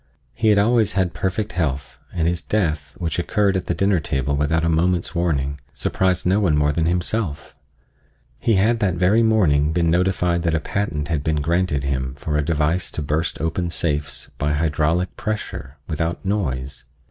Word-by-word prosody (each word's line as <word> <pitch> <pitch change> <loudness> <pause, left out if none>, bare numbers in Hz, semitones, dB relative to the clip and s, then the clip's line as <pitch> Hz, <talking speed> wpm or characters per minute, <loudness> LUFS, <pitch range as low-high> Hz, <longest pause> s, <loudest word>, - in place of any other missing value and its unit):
He 110 - 0
had 105 -1 +5
always 110 0 +3
had 95 -3 0
perfect 95 +3 -2
health, 70 -5 -2
and 85 -2 0
his 85 0 0
death, 75 -9 -1
which 85 -1 -2
occurred 100 +2 +1
at 95 - -2
the 85 - 0
dinner 100 -2 +2
table 70 -1 -1
without 75 +3 +1
a - - +2
moment's 85 +3 +1
warning, 70 -5 -1 0.2
surprised 95 -2 0
no 95 +3 +3
one 85 -8 +2
more 75 0 +3
than 80 +2 0
himself. 90 -1 -1 0.9
He 115 - +2
had 110 +5 +3
that 95 -4 +1
very 95 +6 +3
morning 80 -10 +3
been 85 -1 +2
notified 90 -1 +1
that 85 -1 +1
a - - +2
patent 80 -3 -2
had 80 -4 -1
been 80 0 +1
granted 80 -2 0
him 65 -2 -2
for 75 +2 -3
a 75 - +3
device 80 +3 0
to 75 - -3
burst 75 +2 -1
open 80 +3 -1
safes 75 -4 -2
by 75 +1 +1
hydraulic 80 +3 0
pressure, 105 -10 -4
without 80 +2 -2
noise. 70 -12 -2
85 Hz, 180 wpm, -22 LUFS, 75-95 Hz, 0.9 s, had